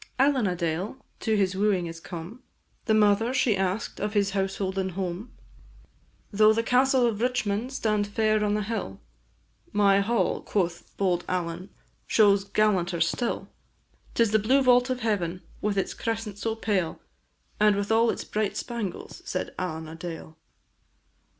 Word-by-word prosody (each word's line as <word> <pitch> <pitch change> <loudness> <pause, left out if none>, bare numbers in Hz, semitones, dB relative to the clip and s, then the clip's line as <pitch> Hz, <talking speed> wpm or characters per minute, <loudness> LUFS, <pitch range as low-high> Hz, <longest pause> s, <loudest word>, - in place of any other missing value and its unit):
Allen 265 -4 +3
a 180 - 0
Dale 175 +7 -2 0.2
to 220 -2 +1
his 190 -2 +1
wooing 195 -3 +1
is 165 0 -7
come; 175 +8 -8 0.4
The 220 - +3
mother 215 +4 +3
she 255 -5 +3
asked 190 +3 -2
of 210 +1 -3
his 200 -1 +2
household 195 0 -1
and 190 -1 -2
home; 185 +4 -4 1.0
"Though 215 +1 +5
the 230 +1 0
castle 255 +1 +3
of 225 -2 -1
Richmond 245 -1 0
stand 215 -6 0
fair 215 0 +1
on 210 0 +1
the 210 - -1
hill, 200 - -4 0.7
My 200 -1 +4
hall," 225 +4 +1
quoth 175 -4 -2
bold 180 -3 +1
Allen, 180 0 -3 0.4
"shows 200 -2 +4
gallanter 190 -5 +1
still; 165 +9 -1 0.7
'Tis 230 -3 +3
the 215 - +4
blue 260 +6 +3
vault 250 0 +5
of 255 -1 -2
heaven, 185 -5 -1 0.2
with 205 -1 -1
its 195 - 0
crescent 225 -3 -4
so 225 0 -1
pale, 200 -7 -1 0.6
And 210 -1 +5
with 200 +1 -2
all 225 +1 +4
its - - -2
bright 210 -1 -2
spangles," 230 -7 -5
said 185 - -4
Allen 160 -3 -4
a 160 - -8
Dale. 165 -1 -8
205 Hz, 155 wpm, -26 LUFS, 185-225 Hz, 1.0 s, Though